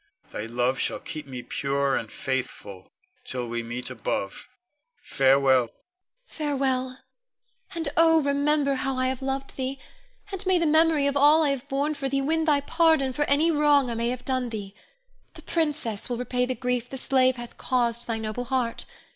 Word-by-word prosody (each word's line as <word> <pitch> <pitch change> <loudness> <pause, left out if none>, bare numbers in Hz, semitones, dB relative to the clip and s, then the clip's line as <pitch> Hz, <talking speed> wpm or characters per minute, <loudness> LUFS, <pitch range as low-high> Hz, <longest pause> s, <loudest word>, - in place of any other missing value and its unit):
Thy 105 - -5
love 125 +3 0
shall - - 0
keep 155 -2 -8
me 125 -2 -7
pure 140 +1 0
and 110 - -3
faithful, 105 -7 -5 0.3
till 125 -2 -4
we 120 0 -3
meet 120 +2 -4
above. 105 - -4 0.5
Farewell! 135 -1 +3
Ione. 120 -2 -4 0.5
Farewell! 265 - -2 0.8
and 330 -2 -2
oh, 325 -1 +5
remember 285 0 +1
how 270 0 -2
I 255 0 +1
have 260 0 -4
loved 270 0 -4
thee; 265 +1 -3 0.5
and 385 -2 -5
may 375 -1 +4
the 335 - +1
memory 315 -1 +4
of 280 0 +1
all 295 +3 +6
I 295 - +2
have 275 +1 -5
borne 285 +3 0
for 280 -2 -3
thee 275 +1 0
win 320 +4 0
thy 290 -3 +3
pardon 315 -3 +2
for 295 +3 0
any 300 +4 +3
wrong 290 -4 +3
I - - -2
may 230 +1 -1
have 250 0 -5
done 255 -2 -1
thee. 205 -3 -6 0.6
The - - -12
princess 295 -11 -2
will 240 - -2
repay 250 0 -1
the 255 - -2
grief 245 -1 -2
the 265 - -6
slave 260 -1 +2
hath 240 -1 -10
caused 240 -2 0
thy 230 -1 -1
noble 220 +2 -4
heart. 245 -2 -1
255 Hz, 180 wpm, -26 LUFS, 210-285 Hz, 0.8 s, all